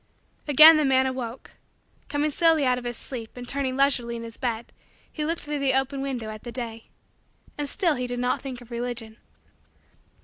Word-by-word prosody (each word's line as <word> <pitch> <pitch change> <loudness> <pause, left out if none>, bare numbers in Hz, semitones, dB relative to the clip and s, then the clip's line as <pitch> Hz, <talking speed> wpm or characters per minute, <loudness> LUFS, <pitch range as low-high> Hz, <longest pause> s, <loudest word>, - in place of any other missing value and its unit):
Again 310 +3 +9
the 305 - +2
man 265 -1 +3
awoke. 255 -2 -5 0.6
Coming 295 +1 0
slowly 320 -2 +3
out 250 -1 +2
of 245 - -12
his 240 -1 -4
sleep 235 -3 -6
and 245 0 -7
turning 270 -1 -1
leisurely 245 -4 +2
in 230 - -6
his 230 0 -8
bed 235 -2 -4 0.4
he 305 - -3
looked 330 +2 -2
through 295 0 -3
the 270 -1 +2
open 270 +1 0
window 250 -5 -4
at 215 0 -9
the 240 - -8
day. 230 -2 -6 0.7
And 290 -1 -3
still 345 -1 +1
he 250 -2 -3
did 245 0 -4
not 250 +1 0
think 260 -3 -7
of 245 0 -15
Religion. 235 -2 -5
255 Hz, 195 wpm, -25 LUFS, 240-280 Hz, 0.7 s, Again